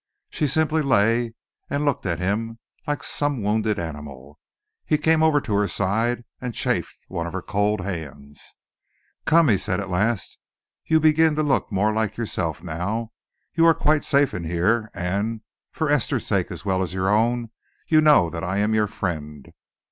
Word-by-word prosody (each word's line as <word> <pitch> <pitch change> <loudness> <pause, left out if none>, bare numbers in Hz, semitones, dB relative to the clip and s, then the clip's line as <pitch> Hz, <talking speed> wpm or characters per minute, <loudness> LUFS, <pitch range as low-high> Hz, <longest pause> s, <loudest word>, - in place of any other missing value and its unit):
She 150 - 0
simply 160 +3 +1
lay 115 -3 +2 0.3
and 145 +1 -1
looked 140 -8 0
at 85 - -1
him 110 +5 -2 0.3
like 145 0 -2
some 145 -6 -1
wounded 105 0 +1
animal. 75 -3 -8 0.4
He 155 - +1
came 160 +1 +2
over 160 -2 +4
to 110 - -4
her 100 0 +2
side 110 +7 0 0.2
and 125 -2 -5
chafed - - -1
one 85 0 -4
of 85 - -7
her 95 -1 -4
cold 105 0 0
hands. 75 -6 -7 0.7
"Come," 165 0 +5
he 105 -7 +3
said 95 -2 -1
at 100 -1 -5
last, 105 +4 -1 0.5
"you 160 0 +4
begin 155 0 +4
to 155 - +1
look 140 -5 0
more 105 +2 +1
like 110 -1 -1
yourself 85 -8 -3
now. 100 +7 -3 0.4
You 165 - +2
are 165 - +6
quite 150 +1 +2
safe 140 -2 +2
in 90 - -4
here, 105 +7 +1
and, 100 +5 -2 0.3
for 160 - -2
Esther's 145 -4 +1
sake - - 0
as - - -8
well 95 -1 +1
as 90 -1 -3
your 95 0 0
own, 115 +2 +1 0.4
you 155 -1 +5
know 150 - +5
that 85 +1 -5
I 95 +1 -2
am 105 +2 +1
your 105 -1 +2
friend." 75 -8 -5
105 Hz, 180 wpm, -23 LUFS, 90-140 Hz, 0.7 s, are